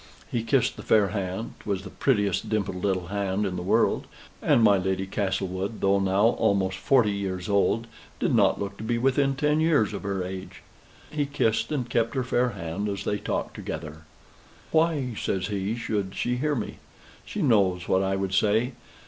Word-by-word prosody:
He 120 - 0
kissed 115 +3 +1
the - - -7
fair 105 -3 +3
hand 100 +1 -3
('twas 100 -3 -3
the 95 - -9
prettiest 105 -8 +1
dimpled 100 -4 -2
little 95 -3 0
hand 100 0 -1
in 95 -2 -2
the 90 - -3
world, 90 - +2 0.3
and 115 - +4
my 100 -3 +6
Lady 95 +1 -1
Castlewood, 95 +1 -2
though 100 0 +3
now 100 +3 +3
almost 95 -1 +2
forty 125 -5 +3
years 95 -3 -3
old, 105 +3 +2 0.3
did - - +1
not - - +4
look 100 0 -4
to - - -7
be 120 +1 0
within 135 +2 +2
ten 150 +2 +2
years 150 -10 +3
of 100 - -4
her 100 -2 -2
age). 95 +1 -7 0.5
He 150 -2 -1
kissed 115 -4 0
and 130 -5 -1
kept 115 0 0
her 130 - +1
fair 125 0 +1
hand, 100 0 -4
as 100 -1 -3
they 105 0 -1
talked - - -3
together. 80 0 -6 0.7
"Why," 155 -6 +2
says 95 -1 -2
he, 100 +1 -1
"should 105 -5 -2
she 125 0 -1
hear 150 +3 0
me? 120 - -4 0.4
She 210 - -4
knows 95 - +3
what 95 - +3
I 95 0 0
would 95 -1 -2
say. 110 +6 +2
100 Hz, 185 wpm, -26 LUFS, 95-120 Hz, 0.7 s, my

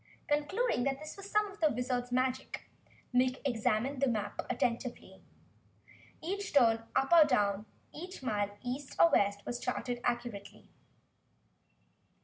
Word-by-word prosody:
Concluding 300 - +1
this 275 +3 -3
was 395 0 -9
some 425 0 +3
of 400 - -15
the 310 - +5
Wizard's 245 0 -2
magic, 255 +1 -1 0.5
Nick 255 +1 +2
examined 245 +2 0
the 275 - +4
map 215 -4 -1
attentively. 240 0 -2 1.0
Each 400 +4 -3
turn 230 -5 +5
up 270 +5 +2
or 335 -2 +10
down, 210 -7 +1 0.3
each 360 -1 -8
mile 205 -4 -1
east 260 +3 -5
or 335 - +7
west, 200 0 +2
was 240 0 -3
charted 245 -1 -3
accurately. 240 -4 -3
250 Hz, 130 wpm, -32 LUFS, 235-295 Hz, 1.0 s, or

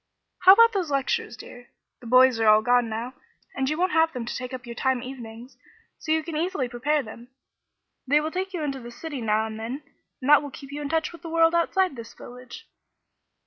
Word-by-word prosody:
"How 370 +1 +9
about 460 +2 +6
those 370 -6 -1
lectures, 270 -4 -1
dear? 245 +2 -13 0.3
The 240 - -12
'boys' 255 0 +5
are 225 - +2
all 215 0 +6
gone 245 0 +2
now, 230 +3 -5 0.4
and 265 0 -1
you 305 - -2
won't 365 +1 +1
have 325 -1 +2
them 245 -2 -5
to 240 - -5
take 250 0 -6
up 255 0 -7
your 235 - -7
time 260 0 -1
evenings, 245 -1 -10 0.4
so 310 - -4
you 315 0 +2
can 325 0 -6
easily 315 -4 -1
prepare 275 +5 -1
them. 230 +2 -11 0.8
They 290 +3 +4
will 310 +1 -3
take 375 +2 -3
you 350 -4 -4
into 275 -2 -3
the 240 -1 -10
city 285 +2 -7
now 220 0 +1
and 220 0 -7
then, 250 +6 -5 0.4
and 255 - -6
that 295 0 +7
will 290 - -7
keep 275 0 -11
you 290 +1 -5
in 285 - -4
touch 320 0 0
with 340 - -13
the 335 - -8
world 330 0 +3
outside 350 0 +1
this 230 -1 -10
village." 250 - -12
265 Hz, 225 wpm, -25 LUFS, 240-320 Hz, 0.8 s, How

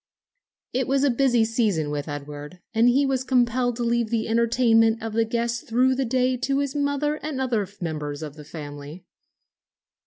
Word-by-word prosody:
It 255 0 0
was 275 +1 +2
a 285 - +4
busy 240 -2 +3
season 210 -10 0
with 145 0 -3
Edward, 145 +2 -7 0.2
and 230 +2 +4
he 275 +3 +3
was 265 -1 0
compelled 245 -1 +1
to 240 - -3
leave 235 -1 +1
the 230 -1 -1
entertainment 225 0 +3
of 225 -1 -5
the 225 0 +2
guests 235 +1 -1
through 255 +3 +2
the 265 +1 -1
day 255 +1 +1
to 275 +2 0
his 280 -1 -1
mother 290 +1 0
and 295 -3 -4
other 230 -7 0
members 150 -3 -4
of 150 -2 -7
the 150 - -11
family. 145 +1 -9
235 Hz, 180 wpm, -24 LUFS, 180-260 Hz, 0.2 s, a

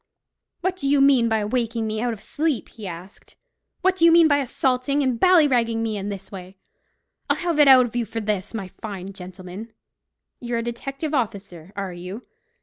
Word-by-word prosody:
"What 370 +1 -1
do 280 - -3
you 285 0 +4
mean 270 -4 +5
by 220 -2 +1
waking 230 0 -1
me 215 0 -2
out 245 0 0
of 220 -3 -8
sleep?" 305 -4 -2
he 215 -4 -9
asked. 180 +3 -11 0.5
"What 375 +1 +3
do 370 - -2
you 335 - +8
mean 335 -1 +7
by 285 -2 +3
assaulting 265 +1 0
and 255 -3 0
ballyragging 250 -11 +4
me 220 -1 -2
in 200 0 -4
this 195 -1 -7
way? 190 -1 -10 0.7
I'll - - +3
have 340 -3 -1
it 295 - +7
out 260 -2 +8
of 240 - -8
you 240 -1 0
for 225 - -4
this, 210 -1 -3
my 195 -4 -4
fine 195 -1 -8
gentleman. 185 +4 -9 0.7
You're 240 -1 -3
a 230 - -2
detective 275 +6 -5
officer, 195 - -3
are 195 -2 -4
you? 180 +7 -8
230 Hz, 195 wpm, -23 LUFS, 200-275 Hz, 0.7 s, you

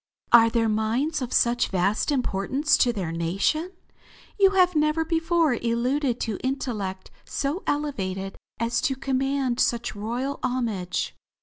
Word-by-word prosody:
"Are 230 -1 +8
their 230 -1 +1
minds 230 +8 0
of 250 - -4
such 240 0 +2
vast 195 - 0
importance 270 +4 +1
to 245 - +3
their 190 -8 -4
nation? 195 - -1 0.7
You 390 -1 +7
have 360 -2 +4
never 305 +1 +2
before 330 -2 +2
alluded 245 +3 0
to 220 -4 -2
intellect 215 -8 -3
so 290 +7 -2
elevated 195 -10 -2 0.2
as 230 +1 0
to 285 -4 0
command 270 -1 -1
such 235 -2 0
royal 240 +7 -3
homage." 215 -9 -2
245 Hz, 130 wpm, -25 LUFS, 215-290 Hz, 0.7 s, Are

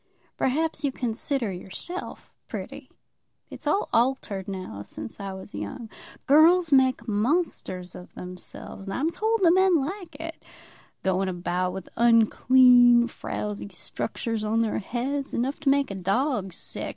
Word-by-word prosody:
"Perhaps 315 +5 0
you 280 - +1
consider 245 -1 -1
yourself 190 - -7
pretty. - - -7 0.6
It's - - -8
all 345 +8 +1
altered 230 -6 0
now 185 - -6
since 110 +2 -7
I 195 -1 -5
was 190 0 -9
young. 105 - -6 0.3
Girls 325 +4 +5
make 260 -3 +3
monsters 210 - -1
of 180 - -12
themselves, 180 +2 -9
and 195 - -3
I'm 310 +5 0
told 445 +3 0
the 335 - +7
men 375 -1 +4
like 330 +2 -3
it; 325 +2 -8 0.6
going 190 0 +1
about 180 0 -2
with 190 -1 -7
unclean, 240 +1 +6
frowsy 210 -3 -5
structures 225 +3 -4
on 225 +2 +1
their 220 - -1
heads, 265 +6 -3
enough 260 +4 -1
to 290 -2 +1
make 275 -4 +2
a - - -3
dog 195 +2 0
sick. 175 - -5
235 Hz, 140 wpm, -26 LUFS, 195-285 Hz, 0.6 s, the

